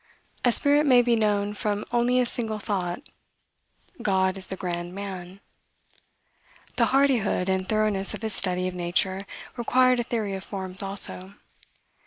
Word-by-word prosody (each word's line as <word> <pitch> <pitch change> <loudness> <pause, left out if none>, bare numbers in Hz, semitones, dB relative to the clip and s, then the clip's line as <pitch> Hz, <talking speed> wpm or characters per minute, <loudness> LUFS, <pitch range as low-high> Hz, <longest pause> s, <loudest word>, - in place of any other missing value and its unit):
A 245 - +4
spirit 290 +4 +4
may 250 -2 +6
be 240 -1 +3
known 205 -2 +1
from 210 0 -2
only 240 +1 +2
a 250 - +3
single 225 -2 -2
thought. 190 -4 -3 0.9
God 190 -1 +1
is 190 -1 -7
the 190 - -5
grand 175 -1 -4
man." 190 -1 -7 1.4
The - - +4
hardihood 255 -9 +2
and 190 0 -1
thoroughness 215 -3 +1
of - - -9
his 220 -1 +2
study 185 -1 +1
of 185 - -4
nature 185 +2 -1 0.3
required 255 +1 +3
a - - +1
theory 220 -4 -2
of 190 0 -5
forms, 190 -2 -2
also. 195 -1 -3
200 Hz, 150 wpm, -25 LUFS, 190-235 Hz, 1.4 s, may